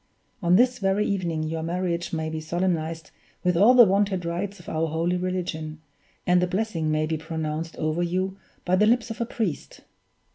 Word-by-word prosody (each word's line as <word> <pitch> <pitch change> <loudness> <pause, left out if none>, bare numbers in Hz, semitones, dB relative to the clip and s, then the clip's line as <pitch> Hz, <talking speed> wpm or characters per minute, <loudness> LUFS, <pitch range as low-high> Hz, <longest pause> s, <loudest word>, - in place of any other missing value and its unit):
On 175 -1 +4
this 250 +4 +4
very 195 +1 +1
evening 170 -5 -1
your 160 +1 -3
marriage 170 +1 -2
may 160 -1 -2
be 160 0 -4
solemnized 165 -1 -2 0.3
with 180 -1 +2
all 215 +9 +6
the 240 -2 +9
wonted 195 -2 +1
rites 185 +4 -3
of 175 - -15
our 160 +1 0
holy 165 +3 0
religion, 180 -4 -3 0.5
and 180 0 +4
the 180 - +2
blessing 185 -4 -1
may 155 0 +1
be 160 0 -1
pronounced 160 0 -4
over 155 +2 -1
you 185 +2 -1 0.3
by 180 - +3
the 210 +3 +4
lips 235 0 +2
of 225 - -6
a 235 - -1
priest. 210 -11 -4
175 Hz, 185 wpm, -25 LUFS, 160-195 Hz, 0.5 s, the